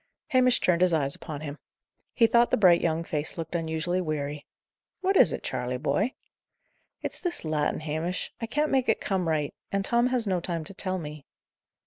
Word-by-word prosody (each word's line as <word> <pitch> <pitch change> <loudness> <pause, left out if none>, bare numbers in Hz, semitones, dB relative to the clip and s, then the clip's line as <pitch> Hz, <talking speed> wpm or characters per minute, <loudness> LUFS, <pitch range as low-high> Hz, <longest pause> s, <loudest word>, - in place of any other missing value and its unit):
Hamish 255 -3 +4
turned 175 -1 +2
his 180 -2 +4
eyes 140 -3 +3
upon 150 -2 -4
him. 145 -1 -6 0.6
He 230 - +5
thought 235 +1 +4
the - - +2
bright 180 -5 +6
young 165 0 0
face 155 0 -3
looked 165 0 -5
unusually 165 +2 -1
weary. 150 -3 -3 0.5
"What 385 +1 +1
is 175 - +6
it, - - -4
Charley, 125 0 -2
boy?" 155 - 0 0.9
"It's - - -3
this 350 - -2
Latin, 155 -1 0
Hamish. 160 +4 -3
I 230 - -2
can't 295 +6 0
make 265 -3 +2
it 220 - +3
come 190 -4 -1
right. 155 -3 0 0.2
And 195 0 0
Tom 235 +3 +3
has 250 -3 +1
no 185 -3 +1
time 170 -2 -3
to 195 - -10
tell 185 -1 -3
me." 150 -4 -8
170 Hz, 190 wpm, -27 LUFS, 155-220 Hz, 0.9 s, bright